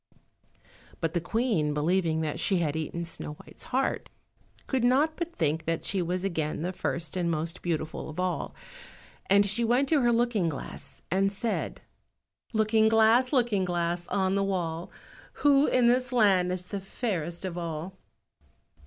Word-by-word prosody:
But 165 Hz, -1 st, -1 dB
the 175 Hz, -, 0 dB
Queen, 180 Hz, -7 st, 0 dB
believing 160 Hz, +1 st, +1 dB
that 155 Hz, 0 st, -2 dB
she 190 Hz, +2 st, +2 dB
had 160 Hz, -4 st, 0 dB
eaten 160 Hz, +2 st, -3 dB
Snow 165 Hz, -2 st, -4 dB
white's -, -, -11 dB
heart, 265 Hz, +2 st, -1 dB, 0.6 s
could 260 Hz, -3 st, 0 dB
not 280 Hz, +6 st, +3 dB
but 340 Hz, 0 st, -4 dB
think 160 Hz, 0 st, 0 dB
that 165 Hz, 0 st, -1 dB
she 195 Hz, -2 st, +1 dB
was 180 Hz, +2 st, -2 dB
again 160 Hz, -5 st, -2 dB
the 180 Hz, +2 st, -2 dB
first 170 Hz, -2 st, -3 dB
and 175 Hz, -2 st, 0 dB
most 165 Hz, 0 st, -2 dB
beautiful 160 Hz, -2 st, -3 dB
of 155 Hz, +3 st, -7 dB
all; 180 Hz, -1 st, -2 dB, 0.7 s
and 200 Hz, +1 st, +6 dB
she 210 Hz, +4 st, +1 dB
went 245 Hz, +4 st, +3 dB
to 310 Hz, -4 st, +4 dB
her 240 Hz, -1 st, +3 dB
looking 230 Hz, -7 st, +2 dB
glass 140 Hz, -1 st, -7 dB
and 195 Hz, +2 st, +2 dB
said— 220 Hz, +3 st, -3 dB, 0.7 s
"Looking 220 Hz, -1 st, +3 dB
glass, 225 Hz, +3 st, +4 dB
Looking 235 Hz, -8 st, +2 dB
glass, 175 Hz, -1 st, -1 dB
on 190 Hz, -1 st, +1 dB
the 200 Hz, 0 st, +2 dB
wall, 175 Hz, -4 st, -2 dB, 0.4 s
Who 285 Hz, 0 st, +4 dB
in 250 Hz, -1 st, +3 dB
this 250 Hz, +1 st, +3 dB
land 195 Hz, -7 st, +4 dB
is 180 Hz, 0 st, -3 dB
the 200 Hz, +2 st, -4 dB
fairest 190 Hz, -4 st, -3 dB
of 180 Hz, -2 st, -4 dB
all?" 170 Hz, +1 st, -5 dB
185 Hz, 160 wpm, -28 LUFS, 165-230 Hz, 0.7 s, and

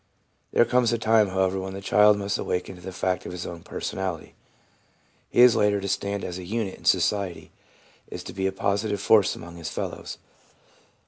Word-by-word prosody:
There 120 Hz, -, +4 dB
comes 120 Hz, -1 st, +2 dB
a 120 Hz, -, +1 dB
time, 110 Hz, -1 st, +3 dB
however, 95 Hz, 0 st, 0 dB
when 95 Hz, 0 st, -5 dB
the -, -, -5 dB
child 105 Hz, +1 st, +5 dB
must 100 Hz, 0 st, -2 dB
awaken 90 Hz, +1 st, -2 dB
to 90 Hz, -, -14 dB
the 95 Hz, +1 st, -7 dB
fact 90 Hz, 0 st, -2 dB
of -, -, -6 dB
his 90 Hz, -1 st, -6 dB
own 85 Hz, -1 st, -7 dB
personality. 95 Hz, -2 st, -5 dB, 1.0 s
He -, -, +3 dB
is 125 Hz, -1 st, +8 dB
later 105 Hz, -1 st, +2 dB
to 100 Hz, -, -4 dB
stand 100 Hz, +1 st, -2 dB
as 90 Hz, +1 st, -5 dB
a -, -, -7 dB
unit 105 Hz, +1 st, -3 dB
in -, -, -17 dB
society, 100 Hz, -4 st, +1 dB, 0.6 s
is -, -, -7 dB
to -, -, -8 dB
be 95 Hz, 0 st, -1 dB
a -, -, -1 dB
positive 100 Hz, +2 st, -1 dB
force 105 Hz, -1 st, +4 dB
among 85 Hz, 0 st, -10 dB
his 80 Hz, -2 st, -5 dB
fellows. -, -, -5 dB
95 Hz, 195 wpm, -25 LUFS, 90-105 Hz, 1.0 s, is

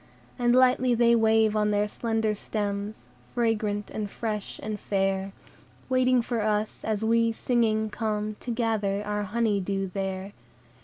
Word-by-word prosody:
And 240 Hz, 0 st, +3 dB
lightly 255 Hz, -1 st, +4 dB
they 235 Hz, 0 st, +4 dB
wave 220 Hz, -1 st, +3 dB
on 210 Hz, 0 st, +2 dB
their 205 Hz, 0 st, +1 dB
slender 225 Hz, 0 st, -1 dB
stems 205 Hz, -, -4 dB, 0.3 s
Fragrant, 215 Hz, -3 st, 0 dB
and 210 Hz, -2 st, -3 dB
fresh, 210 Hz, -1 st, -4 dB
and 210 Hz, -1 st, -4 dB
fair, 195 Hz, -1 st, -1 dB, 0.6 s
Waiting 255 Hz, -1 st, +3 dB
for 235 Hz, -1 st, -2 dB
us, 210 Hz, 0 st, -1 dB
as 220 Hz, 0 st, -1 dB
we 230 Hz, 0 st, +3 dB
singing 220 Hz, -2 st, +1 dB
come 215 Hz, -1 st, -2 dB
To -, -, -8 dB
gather 220 Hz, -4 st, 0 dB
our 210 Hz, 0 st, -1 dB
honey 210 Hz, 0 st, 0 dB
dew 195 Hz, 0 st, -2 dB
there. 195 Hz, 0 st, -3 dB
215 Hz, 145 wpm, -27 LUFS, 205-230 Hz, 0.6 s, lightly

